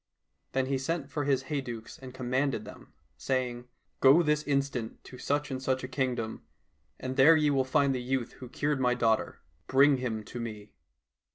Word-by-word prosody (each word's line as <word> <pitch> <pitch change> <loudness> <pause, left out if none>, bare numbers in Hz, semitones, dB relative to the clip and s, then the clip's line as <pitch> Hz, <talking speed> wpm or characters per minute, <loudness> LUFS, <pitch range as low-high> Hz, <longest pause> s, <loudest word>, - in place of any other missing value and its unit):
Then 135 0 +1
he 135 0 -1
sent 145 +1 -3
for 145 0 -2
his 135 -2 +1
hey 140 +1 -2
ducks 115 -3 -8
and 130 -1 -9
commanded 130 -2 -1
them, - - -12 0.3
saying, 125 - -2 0.2
" - - -47
Go 140 +6 +7
this 150 -1 +2
instant 140 -5 -2
to 125 - -12
such 145 0 -1
and 130 -1 -3
such 130 0 -1
a - - -3
kingdom, 125 -4 -2 0.6
and 130 +1 -5
there 145 +5 +8
ye 150 -2 +3
will 135 -2 +2
find 140 +1 +2
the 125 - -2
youth 125 -1 -2
who 125 - -9
cured 145 +2 -1
my 125 -1 +2
daughter; 115 -2 0 0.3
bring 140 +1 +5
him 115 -4 -3
to 120 - -8
me." 105 -3 -7
130 Hz, 190 wpm, -29 LUFS, 125-140 Hz, 0.6 s, there